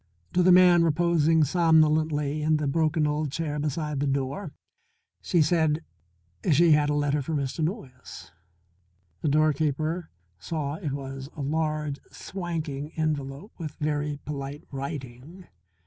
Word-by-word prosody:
To 180 - +3
the 180 +1 +5
man 180 -1 +7
reposing 165 -1 +3
somnolently 155 -2 +2
in 155 +1 +2
the 150 - -2
broken 155 +2 +1
old 150 -1 -1
chair 150 -1 -3
beside 150 0 -2
the 145 - 0
door 135 +6 -2 0.7
she 170 -3 +3
said 160 -1 +1 0.7
she 165 +3 +5
had 150 -1 +4
a 150 - +1
letter 145 0 +1
for 155 +4 -3
Mr. 140 +2 -2
Noyes. 130 - -6 0.9
The - - -1
doorkeeper 155 +2 +1 0.3
saw 145 - -3
it 150 -4 -4
was 135 -1 -6
a 150 - -6
large, 155 -1 -1
swanking 160 -6 -5
envelope 150 +3 -3
with 155 -3 -6
very 150 -1 -1
polite 140 0 -5
writing. 140 +4 -7
150 Hz, 130 wpm, -26 LUFS, 145-160 Hz, 0.9 s, man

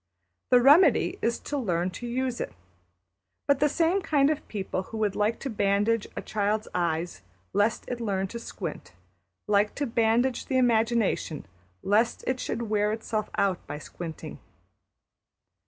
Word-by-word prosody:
The 250 - +7
remedy 285 +2 +5
is 235 0 +1
to 290 - -3
learn 180 -6 0
to 240 +7 -7
use 250 0 -2
it. - - -4 0.9
But 280 -1 +3
the 295 - +3
same 340 +6 +2
kind 290 -3 +3
of 305 - -4
people 190 -3 -3
who 225 - -6
would 210 -3 0
like 210 +2 +1
to 275 - -3
bandage 205 +2 +1
a - - -5
child's 215 +1 -1
eyes 170 - -1 0.3
lest 205 +3 +1
it 245 - -4
should - - -7
learn 195 -4 -1
to 235 - -6
squint, - - -7 0.5
like 210 0 +2
to 285 - -1
bandage 235 +1 +1
the 260 - +1
imagination 225 - +1 0.4
lest 220 +4 +2
it 255 0 -1
should 235 -1 -3
wear 210 -1 +1
itself 215 -1 -3
out 195 -3 0
by - - -5
squinting. 160 +1 -8
225 Hz, 155 wpm, -27 LUFS, 200-250 Hz, 0.9 s, The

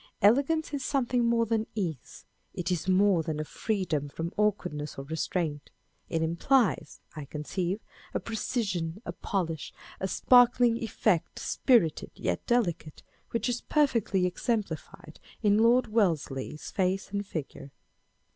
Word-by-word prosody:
Elegance 280 +9 +3
is 280 -2 -2
something 250 -3 +1
more 235 0 +3
than 225 0 0
ease; 165 - -4 0.3
it 180 +1 -2
is 180 +1 -1
more 185 -2 +4
than 155 -1 -3
a - - -1
freedom 160 -6 -2
from 165 +4 -5
awkwardness 180 -8 -1
or 135 - -5
restraint. 155 -1 -2 0.4
It 160 -1 0
implies, 170 - +1
I 150 -2 -6
conceive, 175 +7 -3 0.3
a - - -1
precision, 205 -5 -3
a - - -3
polish, 165 -6 -3 0.3
a 190 - -1
sparkling 245 +3 +5
effect, 215 -6 0
spirited 230 - +2
yet 85 - -2
delicate, 175 -10 0 0.3
which 230 +1 -1
is 245 -1 -1
perfectly 230 -11 +2
exemplified 180 -5 -3 0.2
in 205 0 +4
Lord 235 +3 +5
Wellesley's 160 - -1
face 190 +1 0
and 200 0 -1
figure. 155 -7 -6
195 Hz, 130 wpm, -29 LUFS, 160-230 Hz, 0.4 s, sparkling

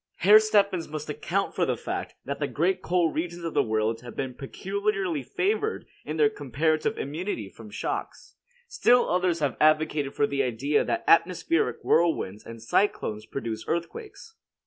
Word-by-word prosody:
Herr 210 +5 +7
Steffens 200 -5 +2
must 155 0 -5
account - - -2
for - - 0
the - - 0
fact - - -5
that 140 +1 -4
the 145 - 0
great 185 +6 0
coal 175 -2 +1
regions 170 +2 -4
of 165 - -3
the - - +4
world 110 +1 -1
have 120 -2 -10
been 130 -2 -3
peculiarly 195 +3 -2
favored 420 - -1 0.2
in - - -5
their 440 - +5
comparative 160 - -1
immunity 150 - -4
from 110 +1 -13
shocks. 105 - -5 0.3
Still 250 - +3
others 180 -2 +1
have 145 -3 0
advocated 155 -2 +2 0.2
the 140 0 +1
idea 135 +4 +1
that - - -2
atmospheric 165 -1 +2
whirlwinds 160 - +1
and 115 -1 -9
cyclones 110 - 0
produce 115 -4 -4
earthquakes. 425 - -5
160 Hz, 155 wpm, -26 LUFS, 135-190 Hz, 0.3 s, Herr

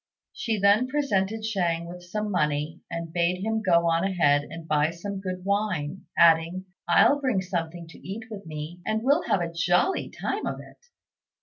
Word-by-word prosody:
She 225 -2 -2
then 200 +5 +4
presented 220 -7 0
Shang 175 -6 0
with 175 +1 -9
some 210 +4 -3
money, 150 -1 -1
and 170 -1 -5
bade 175 +2 +1
him 220 +1 0
go 170 -4 +3
on 165 +1 +2
ahead 145 -7 +2
and 165 -1 -9
buy 150 0 +2
some 190 +4 -5
good 185 -1 -5
wine, 200 -5 -1
adding, 170 +2 +4 0.2
"I'll 285 +11 +5
bring 255 -8 +1
something 175 -2 -4
to - - -13
eat 200 +5 -6
with 205 -2 -7
me, 155 +3 -6
and 220 +3 -1
we'll 285 +5 +2
have 190 - +2
a 170 -1 -3
jolly 175 - +1
time - - -3
of - - -3
it." 480 - -15
180 Hz, 180 wpm, -26 LUFS, 165-210 Hz, 0.2 s, I'll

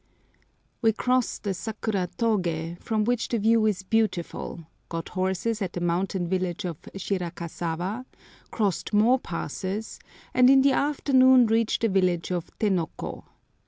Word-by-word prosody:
We 225 -1 +4
crossed 250 +2 0
the 200 - -1
Sakuratogé, 185 -4 -2
from 220 -2 0
which 240 +1 0
the 235 - 0
view 220 +1 +3
is 195 -3 -1
beautiful, 190 -5 -1 0.2
got 165 -1 -4
horses 190 +4 -1
at 185 -3 -2
the - - -3
mountain 175 +1 -1
village 185 -1 -2
of 170 -4 -5 0.2
Shirakasawa, 175 +3 -3 0.4
crossed 205 -2 -1
more 230 +5 +5
passes, 190 - -5 0.3
and 250 0 +6
in 270 0 +6
the 280 - +5
afternoon 260 -3 +4
reached 225 0 +1
the - - +5
village 185 -3 +1
of 175 -1 -2
Tenoko. 185 -7 -2
200 Hz, 130 wpm, -26 LUFS, 175-230 Hz, 0.4 s, and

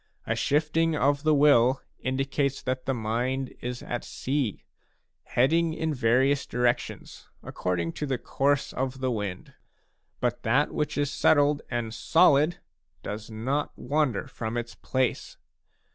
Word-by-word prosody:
A - - 0
shifting 160 +2 +1
of 145 0 +2
the 155 0 +3
will 135 -3 +4 0.2
indicates 135 +1 -1
that 130 +1 -3
the 135 - +2
mind 120 +4 -2
is 125 0 -5
at 120 - -4
sea, 130 -5 -2 0.6
heading 160 +6 +2
in 160 -1 -1
various 130 +3 +2
directions, 125 0 -2
accord 90 -1 -2
ing 85 -1 -1
to 150 - -4
the 130 -2 0
course 140 +3 0
of 130 0 -3
the 130 -1 0
wind. 105 -5 -4 0.7
But 120 -1 -1
that 130 +6 +2
which 150 -1 -2
is 145 -1 0
settled 145 0 +3
and 120 -2 -3
solid 155 +6 +4 0.5
does 105 +1 -6
not 130 +7 -2
wander 145 -7 0
from 110 0 -4
its 120 0 -4
place. 130 -1 -2
130 Hz, 140 wpm, -27 LUFS, 120-145 Hz, 0.7 s, will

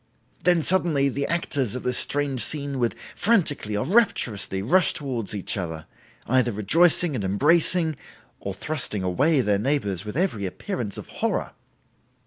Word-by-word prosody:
Then 175 -3 +3
suddenly 160 -7 +3
the 140 +1 -3
actors 140 -8 -1
of 125 - -5
this 125 0 +1
strange 140 -3 0
scene 140 -3 -2
would 120 -2 0 0.2
frantically 145 - +1
or 105 - -1
rapturously 120 - +1
rush 180 - +3
towards 125 -8 -4
each 100 +1 -2
other, 80 -4 -5 0.4
either 125 -1 +2
rejoicing 160 - +3
and 115 -6 -3
embracing 160 - +2 0.4
or 100 -1 -5
thrusting 125 -7 -2
away 135 - +2
their 105 -4 +1
neighbors 105 - -1
with 105 +5 -6
every 140 - 0
appearance 115 - -5
of - - -8
horror. - - -2
135 Hz, 145 wpm, -24 LUFS, 105-160 Hz, 0.4 s, Then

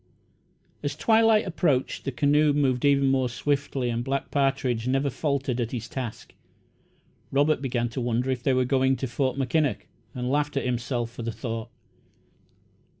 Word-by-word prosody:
As 145 0 -3
twilight 220 +5 +4
approached, 155 -7 0
the 135 - -1
canoe 145 +3 +3
moved 135 -3 +1
even 140 -1 +4
more 130 -2 +1
swiftly 135 -1 -1
and 120 +1 -2
Black 135 +2 -2
Partridge 135 -4 0
never 135 +2 +1
faltered 135 -3 -1
at 115 - -2
his 115 -2 -4
task. 120 -3 -6 1.0
Robert 145 +1 +2
began 120 -3 -1
to 120 +3 -4
wonder 120 +2 0
if 125 -2 -2
they 135 +1 +2
were 130 0 +2
going 130 0 +2
to 130 - -3
Fort 130 +2 -1
Mackinac, 140 +2 0 0.3
and 125 0 -3
laughed 145 0 0
at 140 - -1
himself 120 -1 -2
for 120 - -8
the 115 0 -3
thought. 115 +1 -5
130 Hz, 160 wpm, -26 LUFS, 120-145 Hz, 1.0 s, twilight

